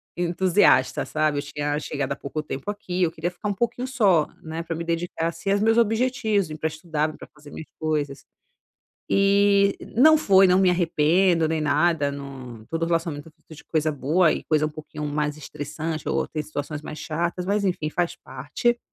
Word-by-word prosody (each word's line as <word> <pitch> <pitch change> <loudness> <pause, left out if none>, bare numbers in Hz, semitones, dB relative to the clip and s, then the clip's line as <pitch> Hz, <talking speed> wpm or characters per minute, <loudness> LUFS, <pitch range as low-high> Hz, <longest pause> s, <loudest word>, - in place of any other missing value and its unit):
entusiasta 175 -6 +3
sabe, 150 0 0
eu - - -1
tinha 145 0 -3
chegado 140 -2 -3
há - - -7
pouco 155 +2 -5
tempo 140 +4 -6
aqui, 185 -3 -4
eu 170 - +3
queria 165 +2 -3
ficar 205 +4 -5
um - - 0
pouquinho 240 +4 -2
só, 200 - +3 0.2
né, 160 +1 -5
pra 165 - -4
me 165 - -4
dedicar 165 0 -2
assim 170 +4 -5
aos 200 - +3
meus 225 +1 +3
objetivos 225 -5 +1
e - - -5
pra 160 - -1
estudar, 155 -1 -2
pra - - -11
fazer 150 -1 -15
minhas 160 - -8
coisas. 150 -3 -2 0.9
E 200 0 +4 0.2
não 310 +7 +7
foi, 195 -7 +5
não 180 - +4
me 190 -1 +4
arrependo 170 0 +2
nem 160 0 -1
nada, 150 0 +2
num 130 -5 -9
todo 165 0 -1
relacionamento 165 -3 -2
é 155 - -19
feito 160 - -16
de - - -14
coisa 155 -1 0
boa 155 +5 +2
e - - -4
coisa 155 -1 +2
um - - -2
pouquinho 150 0 -8
mais 150 0 -1
estressante 155 +2 -5
ou - - 0
tem 155 - -4
situações 150 0 -5
mais 150 - -8
chatas, 170 +3 -2
mas 205 +1 +1
enfim 175 -5 -1
faz 175 +1 -1
parte, 140 - -2
160 Hz, 195 wpm, -24 LUFS, 150-190 Hz, 0.9 s, não